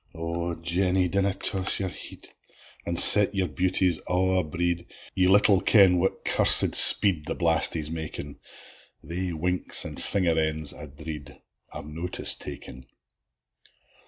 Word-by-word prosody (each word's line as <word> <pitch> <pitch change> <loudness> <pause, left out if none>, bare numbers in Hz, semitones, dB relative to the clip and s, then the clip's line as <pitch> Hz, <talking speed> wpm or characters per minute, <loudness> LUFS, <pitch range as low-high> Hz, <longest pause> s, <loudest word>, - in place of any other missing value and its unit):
O 85 +1 -9
Jeany, 90 +2 -4
dinna 100 -1 -5
toss 95 -1 -4
your 95 -1 -8
head, - - -15 0.6
An' 85 0 -7
set 105 +2 +8
your 95 -1 -5
beauties 90 +1 -4
a' 95 +1 -4
abread! 85 +1 -8 0.3
Ye 90 -1 -4
little 100 0 0
ken 95 -5 0
what 95 +2 -7
cursed - - +2
speed 90 -8 +6
The - - -7
blastie's 80 -2 -1
makin: 80 -3 -12 0.7
Thae 90 +1 -9
winks 90 +3 +2
an' - - -12
finger 85 -5 -4
ends, 80 -2 -3
I 75 - -14
dread, 75 0 -15 0.3
Are - - -9
notice 80 +4 0
takin. 65 +1 -12
85 Hz, 130 wpm, -20 LUFS, 80-95 Hz, 0.7 s, set